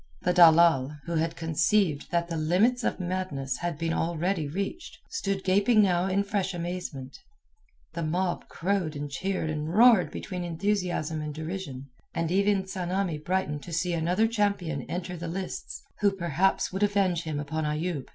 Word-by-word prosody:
The 180 Hz, -, +2 dB
dalal, 160 Hz, -5 st, +6 dB
who 170 Hz, -, -4 dB
had 165 Hz, +1 st, 0 dB
conceived 165 Hz, 0 st, +1 dB
that 170 Hz, -1 st, 0 dB
the 170 Hz, -, -4 dB
limits 190 Hz, +11 st, +2 dB
of -, -, -1 dB
madness 175 Hz, -8 st, -2 dB
had 170 Hz, 0 st, -3 dB
been 165 Hz, +1 st, -1 dB
already 170 Hz, 0 st, -1 dB
reached, 200 Hz, -, -5 dB
stood 195 Hz, -1 st, -2 dB
gaping 205 Hz, +4 st, +4 dB
now 180 Hz, -1 st, +2 dB
in 195 Hz, +1 st, +1 dB
fresh 200 Hz, -2 st, -2 dB
amazement. 170 Hz, -6 st, -5 dB, 0.7 s
The 170 Hz, -, -4 dB
mob 175 Hz, +3 st, -1 dB
crowed 180 Hz, -3 st, -1 dB
and 145 Hz, 0 st, -5 dB
cheered 185 Hz, +1 st, -2 dB
and 155 Hz, +1 st, -3 dB
roared 225 Hz, -1 st, +6 dB
between 180 Hz, -2 st, -5 dB
enthusiasm 175 Hz, -3 st, -1 dB
and 150 Hz, -1 st, -5 dB
derision, 155 Hz, -5 st, -6 dB, 0.2 s
and 165 Hz, 0 st, -1 dB
even 200 Hz, +1 st, +2 dB
Tsamanni 185 Hz, -3 st, -2 dB
brightened 170 Hz, -4 st, -1 dB
to 175 Hz, -, -10 dB
see 175 Hz, +2 st, 0 dB
another 175 Hz, +7 st, +2 dB
champion 200 Hz, -9 st, 0 dB
enter 180 Hz, +2 st, -4 dB
the 170 Hz, 0 st, -6 dB
lists 185 Hz, +2 st, -5 dB, 0.2 s
who 205 Hz, -, +4 dB
perhaps 180 Hz, 0 st, 0 dB
would 190 Hz, -, -3 dB
avenge 195 Hz, -4 st, +2 dB
him 155 Hz, -3 st, -3 dB
upon 155 Hz, +2 st, -3 dB
Ayoub. 150 Hz, -1 st, -2 dB
175 Hz, 160 wpm, -27 LUFS, 160-195 Hz, 0.7 s, dalal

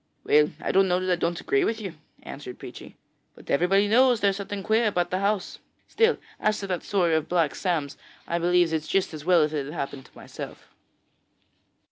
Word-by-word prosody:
'Well, 150 Hz, 0 st, +4 dB
I -, -, -2 dB
don't 195 Hz, 0 st, +4 dB
know 180 Hz, 0 st, +2 dB
that 185 Hz, 0 st, -1 dB
I -, -, +4 dB
don't 170 Hz, 0 st, -2 dB
agree 405 Hz, -1 st, +1 dB
with 225 Hz, -9 st, -1 dB
you,' 195 Hz, -5 st, -6 dB, 0.3 s
answered 135 Hz, -3 st, -8 dB
Peechy; -, -, -11 dB, 0.4 s
'but -, -, -9 dB
everybody 195 Hz, +7 st, +3 dB
knows 245 Hz, +2 st, +4 dB
there 200 Hz, -1 st, +3 dB
is 195 Hz, -, -5 dB
something 200 Hz, 0 st, -5 dB
queer 220 Hz, +2 st, +2 dB
about 175 Hz, -4 st, 0 dB
the 185 Hz, -, 0 dB
house. 200 Hz, 0 st, -1 dB, 0.3 s
Still, 455 Hz, +1 st, +2 dB, 0.2 s
as 215 Hz, 0 st, +1 dB
to 200 Hz, -, -5 dB
that 185 Hz, -3 st, -2 dB
story 180 Hz, -5 st, +1 dB
of 160 Hz, 0 st, 0 dB
Black 170 Hz, -4 st, +1 dB
Sam's, 160 Hz, -7 st, -2 dB, 0.3 s
I 170 Hz, -, -1 dB
believe 175 Hz, -1 st, +2 dB
it 160 Hz, -, +2 dB
just 185 Hz, +3 st, -1 dB
as 155 Hz, -1 st, -8 dB
well 175 Hz, -3 st, +5 dB
as 150 Hz, 0 st, -1 dB
if 150 Hz, -, 0 dB
it -, -, -6 dB
had 145 Hz, -, -7 dB
happened 140 Hz, -3 st, -5 dB
to -, -, -28 dB
myself.' -, -, -9 dB
180 Hz, 215 wpm, -25 LUFS, 160-200 Hz, 0.4 s, well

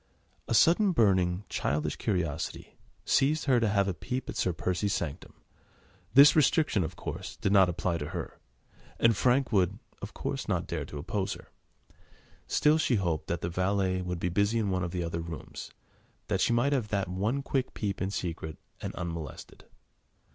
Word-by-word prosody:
A 115 Hz, -, +1 dB
sudden, 180 Hz, -, +5 dB
burning, 95 Hz, -, +2 dB
childish 75 Hz, +1 st, -1 dB
curiosity 85 Hz, -5 st, -3 dB, 0.3 s
seized 150 Hz, +3 st, +2 dB
her 130 Hz, -3 st, +4 dB
to 115 Hz, -2 st, +1 dB
have 100 Hz, -1 st, +2 dB
a 95 Hz, -, 0 dB
peep 125 Hz, +10 st, -4 dB
at -, -, -5 dB
Sir 90 Hz, -, +1 dB
Percy's 90 Hz, +4 st, -1 dB
sanctum. 75 Hz, -5 st, -5 dB, 0.8 s
The 140 Hz, +3 st, +9 dB
restriction, 150 Hz, -, +3 dB
of 80 Hz, +2 st, -5 dB
course, -, -, -6 dB
did 100 Hz, -, 0 dB
not 95 Hz, -3 st, +6 dB
apply 85 Hz, 0 st, -1 dB
to 75 Hz, -, -4 dB
her, -, -, -6 dB, 0.6 s
and 115 Hz, -1 st, +4 dB
Frank 130 Hz, +4 st, +2 dB
would, 100 Hz, -1 st, +2 dB, 0.2 s
of -, -, -7 dB
course, -, -, -3 dB
not -, -, 0 dB
dare -, -, -3 dB
to 75 Hz, -, -8 dB
oppose 95 Hz, +6 st, -2 dB
her. -, -, -13 dB, 1.0 s
Still, 150 Hz, +1 st, +3 dB
she 135 Hz, -5 st, +2 dB
hoped 85 Hz, -7 st, -1 dB
that 85 Hz, -, -2 dB
the 85 Hz, -, -2 dB
valet 95 Hz, +1 st, 0 dB
would 90 Hz, -1 st, -3 dB
be 90 Hz, -, -1 dB
busy 100 Hz, +5 st, +1 dB
in 105 Hz, -4 st, 0 dB
one 90 Hz, -1 st, 0 dB
of 90 Hz, -, -2 dB
the 90 Hz, 0 st, -3 dB
other 85 Hz, 0 st, -3 dB
rooms, 85 Hz, -1 st, -7 dB, 0.6 s
that -, -, +1 dB
she -, -, +3 dB
might 120 Hz, +5 st, +2 dB
have 125 Hz, -6 st, 0 dB
that 100 Hz, -3 st, -1 dB
one 105 Hz, +10 st, -1 dB
quick 135 Hz, -1 st, -2 dB
peep 100 Hz, -2 st, -3 dB
in 95 Hz, -, 0 dB
secret, 85 Hz, -5 st, -4 dB, 0.2 s
and -, -, -5 dB
unmolested. 85 Hz, -4 st, -7 dB
95 Hz, 180 wpm, -29 LUFS, 85-115 Hz, 1.0 s, The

